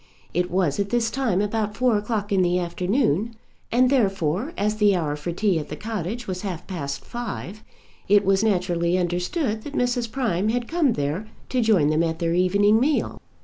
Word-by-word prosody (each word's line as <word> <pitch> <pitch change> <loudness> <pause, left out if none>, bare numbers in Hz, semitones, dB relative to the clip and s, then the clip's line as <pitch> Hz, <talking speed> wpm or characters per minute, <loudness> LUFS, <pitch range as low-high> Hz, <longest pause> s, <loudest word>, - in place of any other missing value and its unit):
It 180 +1 0
was 180 -5 0
at 200 0 0
this 230 0 +1
time 240 -8 0
about 210 0 -2
four 250 -3 +3
o'clock 205 0 -2
in 195 -2 +3
the 180 0 +2
afternoon, 185 - 0 0.4
and 250 +2 +4
therefore, 195 - +1
as 210 +1 0
the 205 -2 +4
hour 155 -4 -1
for 150 +4 -4
tea 185 -1 +1
at 150 - -7
the - - -4
cottage 220 +1 -4
was 185 -1 -4
half 185 -5 -5
past 140 -7 -5
five, 220 -3 -6 0.4
it 205 0 +4
was 195 +1 +3
naturally 180 -4 +1
understood 185 - -1
that 290 +5 -8
Mrs. 245 -2 0
Prime 215 -7 0
had 240 +1 -1
come 320 -7 +2
there 150 +8 -2 0.2
to 255 - +1
join 195 -10 +3
them 155 +1 +2
at 165 -1 0
their 165 0 0
evening 200 +4 +3
meal. 290 +4 0
200 Hz, 190 wpm, -24 LUFS, 175-230 Hz, 0.4 s, and